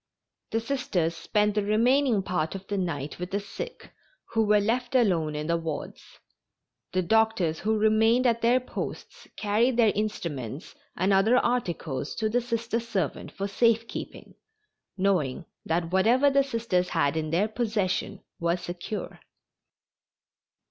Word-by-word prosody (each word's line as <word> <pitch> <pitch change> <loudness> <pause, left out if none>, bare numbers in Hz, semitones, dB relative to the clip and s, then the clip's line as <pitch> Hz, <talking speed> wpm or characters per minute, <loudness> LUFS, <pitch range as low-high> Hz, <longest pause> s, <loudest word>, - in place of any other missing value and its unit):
The 225 - 0
Sisters 210 -10 -1
spent 210 +5 +1
the 210 - +1
remaining 230 +2 +3
part 180 -3 -2
of 195 0 -7
the 205 - -3
night 150 -5 -3
with 180 0 -4
the 200 +1 -1
sick 480 - -8 0.4
who 225 -1 +3
were 210 0 +4
left 240 +5 -1
alone 170 -11 +2
in 150 0 -3
the 170 +1 +1
wards. 160 -3 -6 0.7
The 185 0 +1
doctors 220 -5 +2
who 220 +1 +1
remained 220 +3 +3
at 235 -1 +2
their 240 +2 +4
posts 255 - -7
carried 225 +4 +1
their 225 -3 +5
instruments 165 - -4 0.2
and 190 +3 +2
other 210 +6 +4
articles 170 - -1
to 220 -1 0
the 245 +3 +1
Sister 230 -1 -2
servant 205 - -3
for 195 - -3
safe 230 +2 +2
keeping, - - -8 0.6
knowing 180 -8 0 0.2
that 165 +1 0
whatever 240 +9 +4
the 275 0 +4
Sisters 225 -9 -1
had 140 +1 +1
in 155 -1 -2
their 180 +7 +2
possession 210 -4 -2 0.2
was 170 +1 0
secure. 175 +4 -6
205 Hz, 145 wpm, -27 LUFS, 175-230 Hz, 0.7 s, their